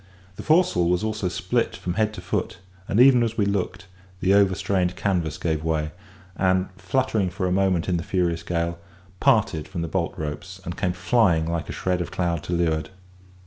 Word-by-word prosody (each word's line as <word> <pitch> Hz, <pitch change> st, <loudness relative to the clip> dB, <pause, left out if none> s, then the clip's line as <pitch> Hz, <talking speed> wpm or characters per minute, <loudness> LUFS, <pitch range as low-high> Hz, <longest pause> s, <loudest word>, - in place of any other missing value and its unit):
The -, -, -7 dB
foresail 155 Hz, -, +3 dB
was 90 Hz, +3 st, +1 dB
also 110 Hz, -3 st, -1 dB
split 90 Hz, +7 st, -1 dB
from 90 Hz, -, -4 dB
head 110 Hz, +2 st, +1 dB
to -, -, -7 dB
foot; 95 Hz, -3 st, -2 dB, 0.3 s
and, 105 Hz, -, +1 dB
even 125 Hz, -1 st, +7 dB
as 115 Hz, -2 st, -1 dB
we 105 Hz, -, +2 dB
looked, 100 Hz, -2 st, -2 dB, 0.3 s
the 95 Hz, +2 st, +3 dB
overstrained 95 Hz, -2 st, +2 dB
canvas 90 Hz, -5 st, -1 dB
gave 80 Hz, -2 st, -1 dB
way, 80 Hz, -1 st, -1 dB, 0.4 s
and, 95 Hz, 0 st, +1 dB
fluttering 100 Hz, +1 st, 0 dB
for 95 Hz, +1 st, -3 dB
a 90 Hz, -, 0 dB
moment 95 Hz, -2 st, +1 dB
in 90 Hz, -2 st, +1 dB
the 85 Hz, -, -3 dB
furious 85 Hz, -3 st, 0 dB
gale, 85 Hz, 0 st, -2 dB, 0.4 s
parted 80 Hz, -2 st, +2 dB
from 90 Hz, -3 st, -4 dB
the -, -, -2 dB
bolt 85 Hz, +1 st, -2 dB
ropes, 90 Hz, +5 st, -6 dB
and 85 Hz, -, -4 dB
came 90 Hz, -3 st, -1 dB
flying 90 Hz, -3 st, +2 dB
like 85 Hz, 0 st, -3 dB
a -, -, -2 dB
shred 90 Hz, -1 st, -1 dB
of 85 Hz, -, -4 dB
cloud 85 Hz, -3 st, -1 dB
to 90 Hz, -, -3 dB
leeward. 80 Hz, -2 st, 0 dB
90 Hz, 190 wpm, -24 LUFS, 85-100 Hz, 0.4 s, even